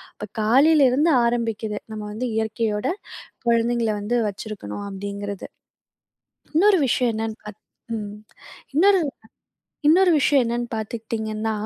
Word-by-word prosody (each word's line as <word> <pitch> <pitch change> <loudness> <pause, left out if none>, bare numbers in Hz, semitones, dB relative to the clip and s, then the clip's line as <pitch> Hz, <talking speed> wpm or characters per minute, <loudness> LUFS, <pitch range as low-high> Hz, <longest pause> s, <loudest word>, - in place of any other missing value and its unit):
இப்ப 210 - -7
காலையிலிருந்து 280 +5 +4
ஆரம்பிக்குது. 225 -3 -1
நம்ம 215 - -5
வந்து 250 +3 -3
இயற்கையோட 220 +1 -1 0.6
குழந்தைங்கள 235 0 +2
வந்து 230 +4 -1
வச்சுருக்கணும் 200 - -6
அப்டிங்கிறது. 200 0 -6 1.1
இன்னொரு 380 +1 +5
விஷயம் 240 0 +2
என்னான்னு 220 0 -3
பாத் 210 -1 -10 0.4
ம். 205 -1 -6 0.6
இன்னொரு 385 +2 +5 0.9
இன்னொரு 360 +3 +6
விஷயம் 275 -1 +4
என்னான்னு 240 +1 -2
பாத்துக்கிட்டீங்கன்னா, 220 0 -3
225 Hz, 105 wpm, -23 LUFS, 215-250 Hz, 1.1 s, இன்னொரு